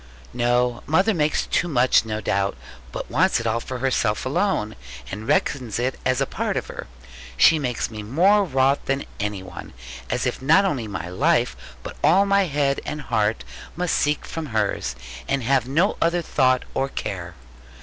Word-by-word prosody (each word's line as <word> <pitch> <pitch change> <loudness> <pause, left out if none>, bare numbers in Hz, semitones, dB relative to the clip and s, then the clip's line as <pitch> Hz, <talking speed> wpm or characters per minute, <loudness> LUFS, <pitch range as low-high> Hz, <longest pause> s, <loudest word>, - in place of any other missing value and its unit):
'No, 120 0 +1
mother 190 +8 +3
makes 150 -4 +1
too 175 - 0
much, 125 -6 +3
no 110 -1 -3
doubt; 100 -1 0 0.3
but - - -6
wants - - +3
it 115 - -6
all 115 +1 +1
for 130 +2 -6
herself 120 -4 0
alone; 130 - 0 0.4
and 105 +4 -6
reckons 130 -5 0
it 125 +2 -2
as 130 0 +1
a 135 - +2
part - - -2
of - - -2
her. - - -8 0.5
She 155 - +6
makes 125 -5 -2
me 110 -1 -6
more 180 - +3
wroth 135 -4 +1
than 135 +1 -1
any 105 -2 -3
one: 95 - -10 0.4
as - - -1
if - - -2
not 160 +9 +5
only 130 - -1
my 100 -4 -5
life, 90 +1 +1 0.3
but - - -8
all 195 +3 +5
my 200 0 +3
head 140 -2 0
and 150 - -5
heart 110 -4 0 0.3
must 180 0 -1
seek 150 0 +1
from 165 -2 -5
hers, 110 - -1 0.3
and 135 -2 0
have 130 0 +2
no 165 +10 +1
other 170 +1 +2
thought 130 -4 +2
or 135 - -1
care.' 90 -8 -5
130 Hz, 180 wpm, -23 LUFS, 110-150 Hz, 0.5 s, She